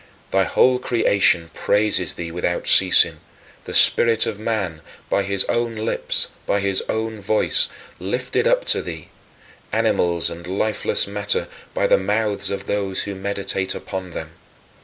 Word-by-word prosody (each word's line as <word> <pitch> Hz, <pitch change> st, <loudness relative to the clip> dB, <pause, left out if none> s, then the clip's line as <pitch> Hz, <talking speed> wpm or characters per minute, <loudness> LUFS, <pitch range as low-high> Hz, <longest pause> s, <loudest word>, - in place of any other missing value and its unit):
Thy 95 Hz, 0 st, +2 dB
whole 130 Hz, 0 st, +2 dB
creation 100 Hz, -9 st, +1 dB
praises 105 Hz, -4 st, +1 dB
thee 85 Hz, -1 st, -7 dB
without 85 Hz, +1 st, -3 dB
ceasing: -, -, +7 dB, 0.5 s
the -, -, -8 dB
spirit 115 Hz, -1 st, +5 dB
of 110 Hz, -2 st, -5 dB
man, 100 Hz, -8 st, -3 dB, 0.3 s
by -, -, +2 dB
his 100 Hz, 0 st, 0 dB
own 120 Hz, -1 st, -2 dB
lips, 110 Hz, +1 st, -2 dB, 0.2 s
by 100 Hz, -, 0 dB
his 100 Hz, -1 st, +1 dB
own 110 Hz, -1 st, -4 dB
voice, 105 Hz, +2 st, +2 dB, 0.3 s
lifted -, -, -2 dB
up -, -, +1 dB
to -, -, -3 dB
thee; 80 Hz, -3 st, -9 dB, 0.6 s
animals 85 Hz, -1 st, 0 dB
and 85 Hz, +1 st, -10 dB
lifeless 100 Hz, +3 st, 0 dB
matter 100 Hz, +1 st, -2 dB, 0.3 s
by -, -, 0 dB
the -, -, +3 dB
mouths 100 Hz, 0 st, -1 dB
of 100 Hz, 0 st, -5 dB
those 100 Hz, -2 st, -2 dB
who 100 Hz, -, -6 dB
meditate 95 Hz, -1 st, -3 dB
upon 95 Hz, -1 st, -7 dB
them. -, -, -8 dB
100 Hz, 145 wpm, -20 LUFS, 95-110 Hz, 0.6 s, ceasing